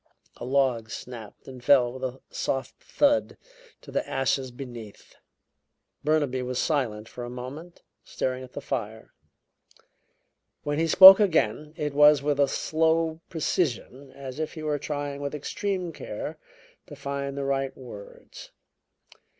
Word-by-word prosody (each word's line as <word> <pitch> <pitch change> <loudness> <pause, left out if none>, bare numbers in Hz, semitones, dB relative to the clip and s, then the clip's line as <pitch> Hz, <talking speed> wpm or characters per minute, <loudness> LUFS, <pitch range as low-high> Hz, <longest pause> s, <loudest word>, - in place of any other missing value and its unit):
A - - -7
log 130 -4 +1
snapped 115 -2 -9
and 130 -2 -10
fell 125 -2 +4
with 130 0 -9
a 130 0 -4
soft 135 0 -3
thud 285 -1 +1 0.4
to - - -12
the - - -2
ashes 135 0 0
beneath. 120 -4 -10 0.9
Burnaby 145 -4 +1
was 125 0 -4
silent 120 -10 -1
for 120 - -8
a 120 - -6
moment, 135 +8 -9 0.2
staring 130 0 -3
at 130 - -13
the 145 - -6
fire. 110 -5 -5 1.5
When 145 +1 -1
he 165 - +2
spoke 190 +4 +11
again, 155 - +1
it 150 -3 -2
was 150 -1 +6
with 145 -1 0
a 140 - +5
slow 160 +2 0
precision 140 -4 -2
as 135 0 -8
if 155 - -3
he 155 - -7
were 150 -1 -1
trying 145 -1 -4
with 145 +1 -3
extreme 180 +3 -3
care 150 +8 -6 0.5
to 145 - -10
find 140 0 -4
the 140 - -2
right 135 -1 -1
words. 110 -6 -11
140 Hz, 140 wpm, -26 LUFS, 125-155 Hz, 1.5 s, spoke